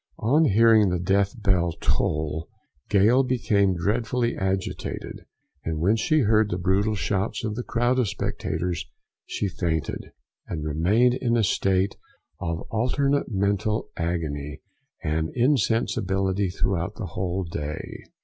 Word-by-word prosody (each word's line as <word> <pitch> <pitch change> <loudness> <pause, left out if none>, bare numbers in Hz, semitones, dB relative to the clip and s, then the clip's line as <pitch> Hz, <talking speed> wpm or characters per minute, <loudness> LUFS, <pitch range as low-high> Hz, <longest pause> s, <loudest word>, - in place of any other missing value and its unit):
On 145 +8 +3
hearing 110 -2 +5
the 90 - 0
death 95 +5 +1
bell 90 -5 +2
toll, 80 +2 -1 0.4
Gale 110 +6 +5
became 105 -7 +2
dreadfully 115 +6 0
agitated; 95 -1 -3 0.4
and 80 -1 -2
when 95 +7 +3
she 155 +6 +2
heard 110 -2 +3
the 90 - -1
brutal 95 +4 +1
shouts 100 +2 -1
of 105 -1 -2
the 120 - -3
crowd 120 +2 +1
of 120 - +2
spectators, 90 -3 -3 0.4
she 100 - -2
fainted, 80 -5 -3 0.4
and 75 -3 -4
remained 95 +11 +3
in 120 -2 0
a 115 - +2
state 95 0 +1 0.4
of 85 -1 -3
alternate 140 +5 +1
mental 100 +2 0
agony 75 -4 -3 0.4
and 80 +1 0
insensibility 100 -6 +1
throughout 90 -1 -1
the - - -5
whole 95 +1 -2
day. 75 -3 -6
100 Hz, 130 wpm, -25 LUFS, 85-115 Hz, 0.4 s, hearing